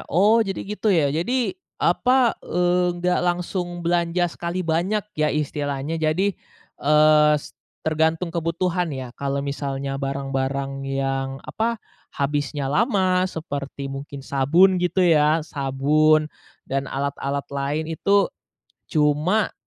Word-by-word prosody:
oh, 210 +7 +4
jadi 195 -3 -2
gitu 210 +2 -2
ya? 155 -7 +3
Jadi, 240 - 0 0.2
apa, 255 -2 +3
eee, 180 0 +1
nggak 180 +1 +1
langsung 175 0 -2
belanja 170 +1 +1
sekali 175 +1 -3
banyak 180 +6 0
ya 155 0 +1
istilahnya, 145 +1 -2
jadi, 170 +6 +1 0.5
eee, 150 0 +5
s 145 - -8 0.3
tergantung 160 +2 +1
kebutuhan 170 +1 -1
ya. 130 -4 -6
Kalau 140 0 -1
misalnya 140 -1 -3
barang-barang 135 0 -3
yang, 135 0 -2
apa, 230 +1 -1 0.3
habisnya 145 -1 -2
lama 185 - +2
seperti 140 -5 -6
mungkin 140 0 -7
sabun 170 +7 +3
gitu 180 +1 +2
ya, 155 -1 +4
sabun 150 +2 +2 0.4
dan 135 0 -2
alat-alat 140 0 -2
lain 140 +3 -1
itu 200 +4 +2 0.6
cuma 155 +7 +2
155 Hz, 115 wpm, -23 LUFS, 140-180 Hz, 0.6 s, eee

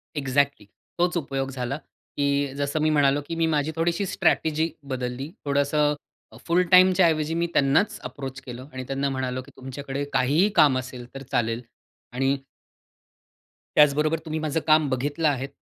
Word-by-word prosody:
Exactly, 140 -4 0 0.3
तोच 175 0 +2
उपयोग 135 -3 -2
झाला. 130 +1 -3 0.4
की 140 -1 +1
जसं 145 +2 -1
मी 155 - +3
म्हणालो 145 -1 +3
की 165 - -4
मी 165 - +1
माझी 150 -1 0
थोडीशी 170 +4 0
स्ट्रॅटेजी 160 -2 +1
बदलली. 130 +1 -4 0.2
थोडंसं 145 +1 +2 0.5
फुल 175 +2 +4
टाईमच्या 185 0 +7
ऐवजी 155 -1 0
मी 170 +1 0
त्यांनाच 140 +9 +2
अप्रोच 135 +1 -6
केलं 125 0 -9
आणि 130 - -5
त्यांना 135 +1 -1
म्हणालो 130 -1 -2
की - - -16
तुमच्याकडे 135 +1 -5
काहीही 150 +11 +3
काम 145 -5 +5
असेल 125 -1 -8
तर 135 - -6
चालेल. 115 -2 0 0.5
आणि 135 +2 +1 1.4
त्याचबरोबर 150 +2 +4
तुम्ही 160 0 -3
माझं 155 0 -1
काम 155 -1 +4
बघितलं 145 +5 0
आहे. 135 -2 0
140 Hz, 150 wpm, -25 LUFS, 135-155 Hz, 1.4 s, टाईमच्या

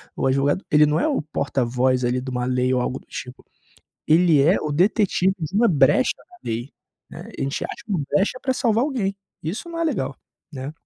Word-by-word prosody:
o - - 0
advogado, 140 +7 +1
ele 150 0 +6
não 150 +2 +1
é - - +1
o 285 - 0
porta 140 -4 -2
voz, 125 +1 +1
ali, 125 +1 0
de 130 - -6
uma 125 -1 -2
lei 125 0 +1
ou 125 - +2
algo 130 +1 -2
do - - -25
tipo. 125 +1 -8 0.7
Ele 160 -3 +5
é 170 +7 +4
o 150 - -3
detetive 190 +2 +2
de 160 0 -5
uma 235 +2 +4
brecha 150 -6 +4
na 360 - -20
lei, 120 +4 -4 0.4
né? - - -9 0.2
A - - -2
gente 135 +1 -2
acha - - -6
uma 190 -6 0
brecha 200 +6 +1
pra 260 - +1
salvar 235 -2 +1
alguém. 235 -9 -1 0.3
Isso 190 - -4
não 335 0 -6
é 335 - 0
legal, 185 - -2 0.4
né? 135 +1 -6
150 Hz, 215 wpm, -22 LUFS, 130-200 Hz, 0.7 s, ele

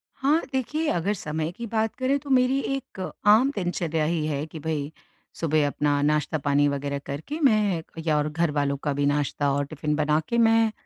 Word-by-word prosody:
हाँ, 290 +5 +2
देखिए 300 +5 -1
अगर 175 +4 0
समय 160 -4 -3
की 235 +6 -7
बात 225 +1 -1
करें 260 +2 +1
तो 280 - -11
मेरी 260 0 +3 0.2
एक 265 -7 -8 0.3
आम 225 +7 +6
दिनचर्या 170 -4 -1
ही 160 -1 0
है, 145 -1 -2
कि 160 0 -9
भई 150 -1 -3 0.5
सुबह 155 -2 +2
अपना 145 0 0
नाश्ता 150 +1 +1
पानी 145 0 +2
वगैरह 140 0 -2
करके 160 - -5
मैं 210 -9 +3 0.2
या 155 -2 +2
और 150 0 0
घरवालों 150 -3 0
का 145 - 0
भी 140 +1 0
नाश्ता 145 0 +1
और 145 +1 0
टिफिन 150 +1 -2
बना 150 0 +2
के 235 - 0
मैं, 225 -1 +4
160 Hz, 190 wpm, -25 LUFS, 145-225 Hz, 0.5 s, आम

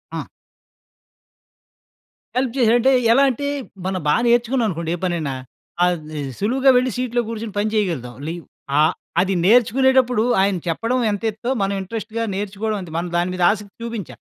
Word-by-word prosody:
ఆ! - - -4 2.1
హెల్ప్ 255 -2 0
చేసాడంటే 240 +1 +4 0.2
ఎలా 275 +4 +5
అంటే 285 +3 -3 0.4
మనం 190 -1 -1
బాగా 150 - +3
నేర్చుకున్నామనుకోండి 230 -9 +1
ఏ - - -7
పనైనా. 165 -6 -1 0.5
అది 155 -4 -1 0.2
సులువుగా 260 +6 +2
వెళ్లి 255 0 +1
సీట్‌లో 245 -1 0
కూర్చొని 225 -2 -5
పని 210 +1 +1
చేయగలుగుతాం. 165 - -1
లి 165 - -2 0.5
ఆహ్, 155 - +4 0.3
అది 195 +1 0
నేర్చుకునేటప్పుడు 250 +1 +4 0.2
ఆయన 195 -1 +2
చెప్పడం 230 +10 0
ఎంతేత్తో, 220 +3 -3
మనం 195 0 0
ఇంట్రెస్ట్‌గా 225 +3 -4
నేర్చుకోవడం 210 +2 -3
అంతే. 170 -3 -9
మనం 175 +1 -2
దాని 175 +1 0
మీద 180 -1 -1
ఆసక్తి 205 -1 -6
చూపించాలి. 230 -6 -6
215 Hz, 140 wpm, -21 LUFS, 180-240 Hz, 2.1 s, ఎలా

